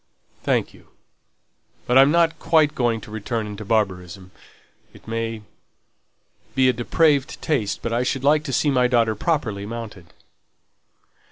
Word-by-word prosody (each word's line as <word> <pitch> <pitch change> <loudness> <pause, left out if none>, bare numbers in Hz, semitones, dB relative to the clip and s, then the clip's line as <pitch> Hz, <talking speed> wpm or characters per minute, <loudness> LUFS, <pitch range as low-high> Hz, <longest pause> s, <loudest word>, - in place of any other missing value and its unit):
"Thank - - 0
you. - - -19 1.0
But 125 - 0
I'm 135 +1 +7
not 165 0 +2
quite 155 -3 +3
going 120 -3 0
to - - -12
return 110 +1 -3
into 105 0 -7
barbarism. 95 -4 -2 0.6
It - - -17
may 115 -1 -4 1.1
be 130 -1 +4
a 130 - +4
depraved 140 +3 +1
taste, 130 -10 -2
but 115 - -2
I 120 - +1
should 130 +1 -2
like 150 +2 +3
to - - -4
see 145 +3 +1
my 125 -2 +3
daughter 115 -3 +2
properly 110 -6 -2
mounted." 110 -6 -8
115 Hz, 145 wpm, -22 LUFS, 110-140 Hz, 1.1 s, I'm